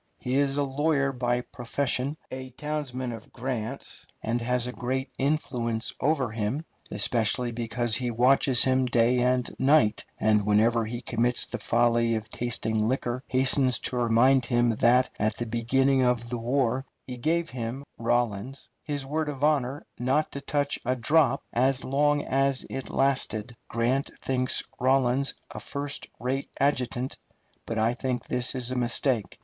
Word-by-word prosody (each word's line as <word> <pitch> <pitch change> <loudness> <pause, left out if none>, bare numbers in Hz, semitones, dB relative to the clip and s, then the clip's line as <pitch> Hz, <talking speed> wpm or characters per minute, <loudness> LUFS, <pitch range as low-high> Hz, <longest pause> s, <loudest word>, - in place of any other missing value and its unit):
He 125 - -4
is 140 0 +1
a 145 - +2
lawyer 140 0 +1
by 125 -1 0
profession, 130 +3 -2
a 130 0 -6
townsman 130 -2 -4
of 115 - -9
Grant's, 125 0 -5 0.2
and 120 +2 -1
has 125 +1 0
a 125 - -3
great 130 +2 -3
influence 125 -5 -1
over 140 -5 +1
him, 115 +8 -2 0.2
especially 115 +3 +1
because 115 0 -1
he 125 -1 -2
watches 125 +2 +4
him 130 -1 +2
day 120 +1 +3
and 125 0 +2
night, 130 -6 +4 0.2
and 105 -1 +3
whenever 110 +3 +3
he 120 +2 -5
commits 120 +1 +1
the 120 - -6
folly 115 +1 +2
of 110 0 -5
tasting 110 -2 -1
liquor 125 0 -2
hastens 130 -1 +2
to - - -3
remind 120 +2 +3
him 120 -1 +3
that 125 +2 +4
at 110 +1 0
the 120 - -3
beginning 130 +4 +2
of 125 -1 +1
the 120 - -2
war 125 +1 0 0.2
he 125 - -7
gave 165 +6 0
him 125 +2 -4 0.2
[Rawlins] 120 +2 -1
his 145 -2 -3
word 155 +2 -1
of 140 -1 -5
honor 145 -2 +1
not 130 +5 +1
to 140 - -6
touch 145 0 -1
a 125 +2 0
drop 140 +2 +3
as 130 +2 +2
long 145 +2 +2
as 135 0 +1
it 135 - -5
lasted. 125 -4 0
Grant 120 +4 0
thinks 130 -1 +1 0.2
Rawlins 130 +1 +2 0.2
a - - -6
first 140 0 -4
rate 130 +4 -2
adjutant, 130 -2 0 0.5
but 115 - -3
I 110 +2 +2
think 125 0 -3
this 125 +1 -1
is 125 -1 0
a - - -2
mistake. 120 -2 0
125 Hz, 155 wpm, -27 LUFS, 120-135 Hz, 0.5 s, watches